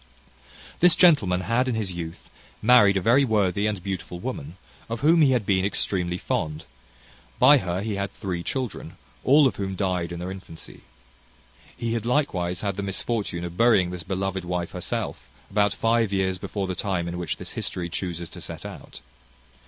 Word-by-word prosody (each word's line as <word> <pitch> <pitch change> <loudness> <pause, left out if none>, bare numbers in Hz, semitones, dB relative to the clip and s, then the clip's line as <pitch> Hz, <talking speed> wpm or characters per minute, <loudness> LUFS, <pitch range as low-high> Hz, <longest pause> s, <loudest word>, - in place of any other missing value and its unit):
This 175 -1 +6
gentleman 105 - +4
had 115 +6 +1
in 125 - 0
his 105 -4 -1
youth 85 -1 -7 0.3
married 105 -4 +6
a - - 0
very 120 +7 +4
worthy 105 -4 +1
and 100 -4 -3
beautiful 90 -3 -5
woman, 90 - -6 0.3
of 115 0 -4
whom 165 +3 +5
he 145 - +6
had 120 -5 0
been 95 -1 +2
extremely 90 -3 -1
fond: 75 -3 -3 0.7
by 145 -1 +7
her 90 -3 -2
he 105 -2 -2
had 100 0 -2
three 95 -3 -4
children, 130 +3 -4 0.3
all 145 +3 +6
of 130 - +1
whom 95 -1 -3
died 90 -3 -1
in 85 - -5
their 90 +2 -5
infancy. 90 -4 -11 1.0
He 115 -1 -2
had 115 -1 -2
likewise 90 - 0
had 100 -2 -2
the - - -1
misfortune 100 -2 -2
of 85 0 -7
burying 105 -6 +4
this 90 -1 -5
beloved 95 +2 -3
wife 90 -1 -3
herself, - - -4 0.2
about 105 0 +3
five 115 0 +1
years 95 -1 0
before 100 +1 -3
the 95 - -3
time 90 -2 -2
in 85 +1 -4
which 85 -4 -3
this - - -6
history 90 -1 -3
chuses 85 -1 -4
to - - -11
set - - -7
out. - - -10
95 Hz, 180 wpm, -25 LUFS, 90-115 Hz, 1.0 s, by